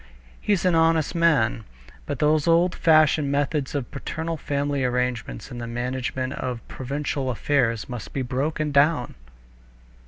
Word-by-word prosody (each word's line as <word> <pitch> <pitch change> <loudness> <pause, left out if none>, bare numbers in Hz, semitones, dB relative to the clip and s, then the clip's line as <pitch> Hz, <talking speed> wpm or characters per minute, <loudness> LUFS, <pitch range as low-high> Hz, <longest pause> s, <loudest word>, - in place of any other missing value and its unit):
He's 200 -3 +1
an 180 - +4
honest 165 -2 +3
man. 155 -10 +2 0.4
But 145 - -3
those 150 +2 +2
old 170 +2 +4
fashioned 155 -3 +4
methods 145 0 -1
of 135 -4 -3
paternal 160 +4 -4
family 145 -2 -1
arrangements 125 - -2
in 120 - -6
the 120 - -5
management 125 +2 -3
of 125 -2 -5
provincial 135 0 -3
affairs 120 -3 0
must 125 -3 -7
be 135 - -2
broken 145 +4 -1
down." 140 -2 +3
140 Hz, 135 wpm, -24 LUFS, 125-155 Hz, 0.4 s, an